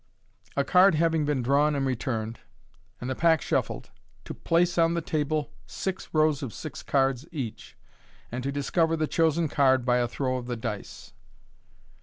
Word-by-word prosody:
A 140 - +3
Card 180 +3 +5
having 160 -1 +2
been 145 -4 0
drawn 145 +4 +3
and 140 -1 0
returned, 115 -3 -2 0.6
and 125 - -5
the 130 - -1
Pack 160 +3 +3
SHUFFLED, - - -2 0.3
TO - - -6
PLACE 175 +1 +1
ON 165 0 +3
THE 170 - 0
TABLE 150 -1 -1 0.2
SIX 190 -1 -4
ROWS 155 -2 +2
OF 135 -5 -4
SIX 155 +3 -7
CARDS 135 +1 0
EACH, 130 -9 -6 0.5
AND 125 +2 -3
TO 140 - -1
DISCOVBR 160 +4 +1
THB 155 -1 -1
CHOSEN 165 0 +2
CARD 130 -3 +3
BY 125 -1 +3
A 120 -1 +1
THROW 130 +1 -2
OF 125 -1 -6
THE 120 -1 -3
DlCE. 110 -3 -6
145 Hz, 170 wpm, -27 LUFS, 130-160 Hz, 0.6 s, Card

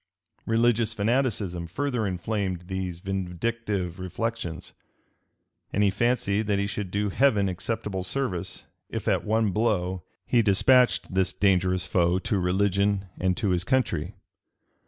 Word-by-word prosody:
Religious 115 0 +2
fanaticism 105 -6 0
further 120 +3 -1
inflamed 95 0 -2
these 90 -1 -4
vindictive 95 0 -3
reflections; 95 -2 -4 1.0
and 105 - +1
he 100 - +4
fancied 110 -1 +1
that 100 -2 +2
he 100 - 0
should 100 -1 -4
do 100 +2 -1
Heaven 105 -3 +3
acceptable 100 +1 -3
service, 95 -4 -3 0.3
if - - -5
at - - +2
one 110 -1 +1
blow 95 -4 0 0.2
he 120 - +3
despatched 120 +2 +3
this 95 -1 +1
dangerous 95 -2 +2
foe 90 -1 +2
to 95 +2 -1
religion 100 +1 +1
and 95 0 +1
to 110 -5 0
his 90 -1 +1
country. 95 -7 0
100 Hz, 130 wpm, -26 LUFS, 90-115 Hz, 1.0 s, he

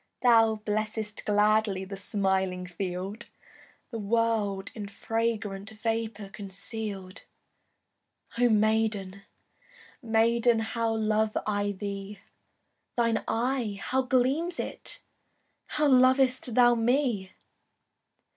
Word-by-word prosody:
Thou 225 -2 +5
blessest 215 0 -3
gladly 210 -2 +2
The 195 +1 -7
smiling 190 -2 -1
field, 185 +4 -5 0.6
The 230 - -4
world 210 -2 0
in 210 -3 -6
fragrant 215 -1 -2
Vapour 220 -2 -3
conceal'd. 195 -1 -7 1.1
Oh 245 +1 +3
maiden, 215 -3 +1 0.8
maiden, 230 0 +3
How 230 0 -1
love 215 0 +1
I 205 -1 0
thee! 200 +1 -6 0.8
Thine 230 -1 +2
eye, 235 -3 -1
how 260 +6 0
gleams 265 +7 +1
it! - - -6 0.6
How 300 0 +1
lov'st 255 -2 +4
thou 240 -1 +6
me! 235 -4 0
220 Hz, 90 wpm, -28 LUFS, 200-235 Hz, 1.1 s, thou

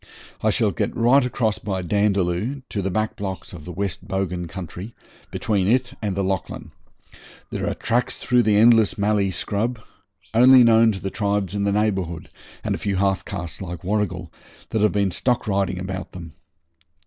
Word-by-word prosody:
I - - +2
shall - - +2
get - - -2
right 125 +4 +5
across 115 -4 0
by 95 -3 -3
Dandaloo 100 - 0
to 100 - -2
the 95 - -1
back 110 +3 -1
blocks 95 -4 -5
of 80 -4 -10
the 90 - -6
West 95 0 -4
Bogan 90 -3 -2
country, 95 +4 -8 0.3
between 100 -4 0
it 125 +3 +1
and 100 -3 -2
the 100 - +1
Lachlan. 95 -1 -3 0.8
There - - -2
are - - -3
tracks 120 +3 -1
through 125 -1 +2
the 105 -3 +3
endless 115 -1 +5
mallee 100 -1 +1
scrub, 110 +6 -2 0.5
only 125 +2 +8
known 115 -1 +5
to 95 - -6
the 95 - -4
tribes 100 -3 -1
in 100 -1 -1
the 100 - +2
neighbourhood, 95 -5 -1 0.3
and - - -1
a - - -3
few 100 -1 -1
half 95 0 +1
castes 85 -4 -6
like 90 -3 -6
Warrigal, 95 -4 -2 0.4
that 110 - 0
have 105 - +4
been 100 -2 +1
stock 120 +7 0
riding 95 -2 0
about 95 0 -5
them. 85 -4 -9
100 Hz, 180 wpm, -23 LUFS, 95-110 Hz, 0.8 s, only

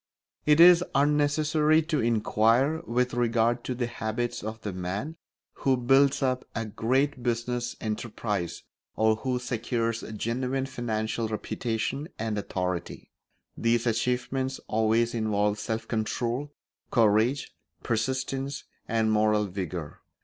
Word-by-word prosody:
It 150 +1 +5
is 175 0 +9
unnecessary 150 +2 +3
to 155 -1 0
inquire 115 +6 +2
with 125 +1 0
regard 120 0 +1
to 125 - -2
the 120 0 -1
habits 120 0 -3
of 110 +1 -5
the 105 - -4
man 95 - -4 0.4
who 135 -1 +3
builds 135 +3 +3
up 130 -1 0
a 115 -1 -2
great 130 +6 0
business 120 0 -2
enterprise 105 -4 -3 0.3
or 110 0 +3
who 125 +2 -1
secures 115 -2 -2
genuine 125 +4 -1
financial 115 -3 -2
reputation 115 +5 -3
and 110 -1 -2
authority; 90 -3 -4 0.4
these 115 0 +1
achievements 125 +3 -1
always 110 +2 +2
involve 105 -2 0
self 110 +1 -3
control, 120 +5 -2 0.4
courage, 115 +4 +2 0.3
persistence, 130 +4 -2 0.2
and 110 -2 +1
moral 105 0 +3
vigour. 90 -5 -5
120 Hz, 115 wpm, -27 LUFS, 110-130 Hz, 0.4 s, is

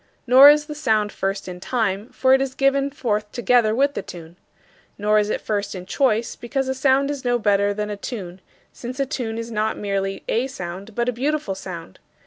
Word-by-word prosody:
Nor 260 +3 +9
is 295 0 +4
the 300 - -6
sound 220 -8 +1
first 195 +1 -3
in 180 -1 -7
time, 215 0 -1
for 260 0 +2
it 265 - +4
is 265 -1 -3
given 275 0 +2
forth 215 -7 -2
together 240 -2 +2
with 280 +3 +2
the - - -3
tune. 170 -1 -11 0.6
Nor 210 +1 +3
is 210 0 0
it - - -1
first 205 -2 -2
in 180 -1 -7
choice, 235 +1 0
because 265 +3 -3
a 265 - 0
sound 270 +1 +2
is 285 -2 -5
no 245 -1 +2
better 205 -2 +2
than 210 +1 -3
a 205 - -4
tune, 190 -5 -7 0.3
since 250 +3 -7
a 275 - +2
tune 240 -5 -4
is 230 0 -5
not 215 0 -1
merely 195 -1 -2
a 240 +4 0
sound 195 -3 -8
but 240 0 0
a - - +2
beautiful 285 -2 -1
sound. 175 - -9
225 Hz, 210 wpm, -22 LUFS, 200-265 Hz, 0.6 s, Nor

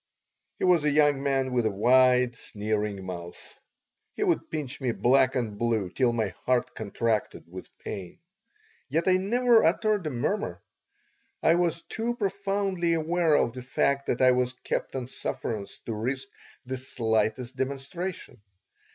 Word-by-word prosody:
He - - 0
was 175 -4 +4
a 150 - +3
young 145 -1 +3
man 135 -2 0
with 120 -3 +2
a - - 0
wide, 125 +3 +4
sneering 105 -3 -3
mouth 85 -2 -9 0.6
He - - -1
would - - 0
pinch 145 -3 -4
me 125 -3 0
black 130 +2 +3
and 110 -5 -2
blue 110 -6 0
till 125 +1 +2
my 115 -2 0
heart 125 -1 +1
contracted 110 0 -2
with 90 +2 -10
pain. 95 -4 -7 0.7
Yet 165 +3 0
I 185 0 +5
never 235 +4 +4
uttered 205 +1 +2
a - - 0
murmur. 125 - -2 0.8
I 165 - +6
was 170 -1 0
too 235 +2 -3
profoundly 195 -4 0
aware 165 0 +2
of 120 - +2
the 130 - -7
fact 140 +2 0
that 125 - +1
I 130 - +7
was 125 0 +1
kept - - -2
on 130 -2 -2
sufferance 110 -4 -5
to 115 - -3
risk 125 +5 -3 0.4
the 130 +1 -3
slightest 120 -1 -1
demonstration. 140 - -4
130 Hz, 150 wpm, -27 LUFS, 115-165 Hz, 0.8 s, I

